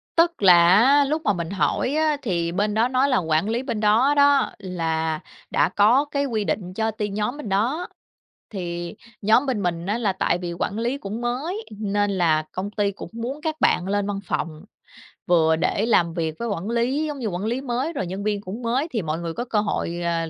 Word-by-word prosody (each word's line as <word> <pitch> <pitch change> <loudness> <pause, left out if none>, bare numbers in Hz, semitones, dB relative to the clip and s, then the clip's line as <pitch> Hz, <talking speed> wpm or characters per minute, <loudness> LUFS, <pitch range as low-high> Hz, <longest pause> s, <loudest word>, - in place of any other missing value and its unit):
Tức 335 -3 +2
là 180 -2 +9 0.2
á, 275 +6 +5
lúc 310 +3 -1
mà 205 - +3
mình 170 -2 -4
hỏi 225 +7 0
á 310 -1 +2
thì 170 -6 -1
bên 205 +4 0
đó 225 +3 +3
nói 260 +2 +2
là 255 - +3
quản 160 +3 +1
lý 240 +3 -1
bên 235 -5 -3
đó 220 +7 +4
đó, 285 0 +4
là 160 -4 -2 0.3
đã - - +3
có 220 +9 +4
cái 285 -1 -1
quy 220 -6 -1
định 185 -3 -3
cho 220 +3 0
tiên 210 -1 -4
nhóm 215 +7 -2
bên 225 -9 -6
đó, 245 - 0 0.6
thì 175 -3 -5 0.3
nhóm 225 +7 +4
bên 230 -6 -1
mình 170 0 -2
á 210 +3 0
là 210 -5 +1
tại 185 - 0
vì 175 -1 -4
quản 195 +5 -3
lý 240 +4 -1
cũng 210 -1 -6
mới 290 - -3
nên 205 -1 0
là 165 -5 +2
công 195 +2 -4
ty 205 -1 0
cũng 200 - -9
muốn 240 +6 -5
các 315 -2 -2
bạn 180 - +2
lên 205 0 0
văn 200 -1 -3
phòng, 155 -3 -4 0.6
vừa 160 -2 +4
để 200 +6 0
làm 170 -8 +2
việc 160 -2 -2
với 235 - -2
quản 200 -1 -3
lý, 250 +6 0
giống 295 -3 -4
như, 230 - -2
quản 185 +2 -3
lý 240 +4 -1
mới 265 +5 -2
rồi 190 - -3
nhân 190 +3 -5
viên 205 -1 -1
cũng 205 +5 -7
mới 250 +6 0
thì 225 -4 -1
mọi 160 0 -3
người 165 -1 -4
có 240 - -4
cơ 215 -3 0
hội, 175 -4 -2
ờ, 165 -1 -1
210 Hz, 225 wpm, -23 LUFS, 180-250 Hz, 0.6 s, là